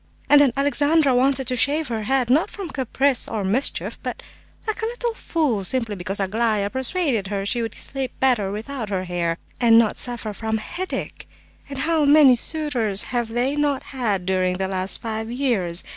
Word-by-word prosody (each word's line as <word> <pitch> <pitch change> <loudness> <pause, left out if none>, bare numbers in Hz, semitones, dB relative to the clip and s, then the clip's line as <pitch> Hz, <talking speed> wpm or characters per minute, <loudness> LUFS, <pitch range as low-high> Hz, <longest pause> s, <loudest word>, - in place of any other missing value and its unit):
And 290 0 +8
then 280 -3 +4
Alexandra 285 +1 +3
wanted 265 +1 +2
to 250 +1 -1
shave 285 +5 +2
her 225 -2 -2
head, 260 -1 +1
not 300 +6 +3
from 385 -6 -7
caprice 265 0 +1
or 215 -3 -3
mischief, 220 +9 -1
but, - - -5 0.4
like 440 +1 -3
a - - 0
little 475 0 -3
fool, 300 - -1
simply 230 0 -1
because 190 +2 -4
Aglaya 205 +1 0
persuaded 260 - 0
her 195 -1 -3
she 235 +4 -1
would 225 -2 -4
sleep 270 -2 -2
better 240 -7 +2
without 220 +2 -5
her 190 -2 -2
hair, 175 -2 -2 0.2
and 230 -2 +6
not 230 -2 +3
suffer 235 -3 -3
from 220 +1 -2
headache! 360 +12 -5 0.4
And 280 - -6
how 310 +2 +2
many 285 -3 +7
suitors 240 -8 +1
have 240 -2 0
they 245 +5 -1
not 290 -2 0
had 210 -8 -1
during 185 -1 0
the 190 0 -1
last 190 +2 -2
five 220 0 -4
years! 230 -10 -1
245 Hz, 180 wpm, -22 LUFS, 205-280 Hz, 0.4 s, And